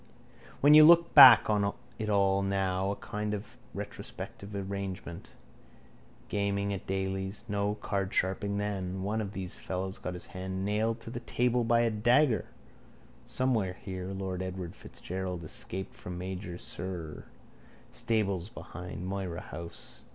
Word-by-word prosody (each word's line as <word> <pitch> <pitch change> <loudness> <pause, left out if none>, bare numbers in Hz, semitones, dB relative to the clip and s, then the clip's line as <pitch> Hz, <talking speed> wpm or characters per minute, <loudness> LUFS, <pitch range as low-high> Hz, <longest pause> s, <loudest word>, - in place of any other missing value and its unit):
When 145 +2 +7
you 155 0 +10
look 170 +1 +7
back 130 -6 +11
on 100 -1 +1 0.2
it 110 -1 -2
all 100 -1 +3
now 95 -1 0
in - - +1
a - - -23
kind 105 -2 -3
of 105 +2 -8 0.2
retrospective 100 +1 -7
arrangement. 95 -3 -5 1.0
Gaming 100 0 0
at 95 - -6
Daly's. 95 +2 -3
No 100 0 0
cardsharping 100 0 0
then. 95 -2 -3
One 105 +3 -1
of 100 -1 -5
those 95 -2 -6
fellows 95 +1 -4
got 90 - -4
his 90 - -7
hand 95 0 -4
nailed 110 +3 0
to 115 - -8
the 120 - -4
table 120 0 +1
by 115 +1 +3
a 115 -1 +2
dagger. 120 - +3 0.8
Somewhere 110 -8 0
here 95 -1 -6
lord 95 -1 -4
Edward 95 -2 -5
Fitzgerald 90 -1 -6
escaped 95 +4 -6
from 90 0 -7
major 90 -1 -5
Sirr. 85 -4 -6 0.7
Stables 105 -6 -1
behind 90 -5 -8
Moira 95 -3 -3
house. 85 -1 -9
100 Hz, 140 wpm, -30 LUFS, 95-105 Hz, 1.0 s, back